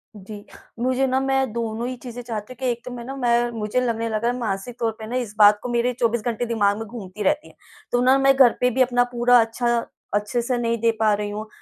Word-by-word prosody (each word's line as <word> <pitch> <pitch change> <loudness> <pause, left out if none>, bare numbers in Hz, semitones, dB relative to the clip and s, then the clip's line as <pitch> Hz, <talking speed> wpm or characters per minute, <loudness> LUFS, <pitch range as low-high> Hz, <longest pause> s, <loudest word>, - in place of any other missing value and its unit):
जी। 205 +1 -10 0.4
मुझे 255 +2 +1
ना 260 0 +1
मैं 270 -2 0
दोनों 230 0 -3
ही 255 - -4
चीज़ें 245 -1 -7
चाहती 230 0 -6
हूँ - - -24
कि 265 - -3
एक 235 0 -5
तो 250 - -6
मैं 245 -1 -7
ना 270 +2 -6
मैं 240 -2 +1
मुझे 215 +4 0
लगने 230 -2 -1
लगा 215 - -1
रहा - - +3
है 250 - -5
मानसिक 220 +1 -3
तौर 230 -1 0
पे 220 - -7
ना, 240 - -4
इस 235 -5 -3
बात 205 0 +6
को 250 - -4
मेरे 240 +1 +1
24 235 -1 +1
घंटे 240 0 -1
दिमाग 205 -3 +1
में 225 - -5
घूमती 210 -2 -7
रहती 295 +10 +1
है। - - -18 0.4
तो 245 - +2
ना, 260 +2 +5
मैं 270 0 +4
घर 260 -3 +6
पे 250 - +4
भी 255 +2 0
अपना 245 -1 +3
पूरा 245 0 +4
अच्छा 235 +1 0 0.4
अच्छे 210 +4 0
से 245 +1 -1
नहीं 235 -1 0
दे 230 0 +4
पा 215 -1 +3
रही 205 0 -2
हूँ, 210 +1 -6
235 Hz, 265 wpm, -23 LUFS, 220-250 Hz, 0.4 s, बात